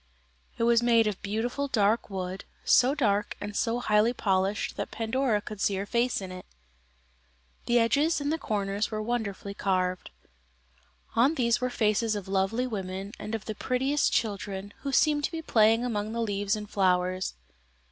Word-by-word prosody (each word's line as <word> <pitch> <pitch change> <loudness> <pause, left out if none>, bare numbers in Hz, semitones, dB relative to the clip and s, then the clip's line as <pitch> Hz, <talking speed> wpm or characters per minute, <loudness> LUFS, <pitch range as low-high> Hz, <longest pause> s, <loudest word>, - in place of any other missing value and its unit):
It - - 0
was 235 0 +4
made 230 -1 +4
of 210 -3 -2
beautiful 230 +7 -2
dark 215 -3 +1
wood, 185 -1 -4 0.2
so 255 +3 +5
dark 210 -7 0
and 205 0 -6
so 230 +2 0
highly 215 0 +3
polished 195 -2 0
that - - -4
Pandora 230 -1 0
could 210 -1 -8
see 200 - +2
her 195 +1 -2
face 235 +1 0
in 190 -1 -6
it. 185 0 -9 1.2
The 240 - +3
edges 285 +8 +3
and 290 +1 -1
the 325 - -2
corners 200 0 -1
were 215 - -3
wonderfully 215 -3 -3
carved. 185 -2 -1 1.1
On 265 +8 +4
these 235 -3 +1
were 250 - 0
faces 220 -1 +1
of 200 -2 -5
lovely 195 +6 0
women, 195 -3 -5
and 215 - -4
of 220 - -6
the 215 - -3
prettiest 265 +6 0
children, 200 -2 -2
who 280 - -4
seemed 295 +1 +3
to - - -3
be 325 -1 -5
playing 225 -1 +4
among 215 -2 -2
the 235 - -1
leaves 205 -1 0
and 210 -1 -6
flowers. 185 - +1
215 Hz, 170 wpm, -28 LUFS, 200-240 Hz, 1.2 s, so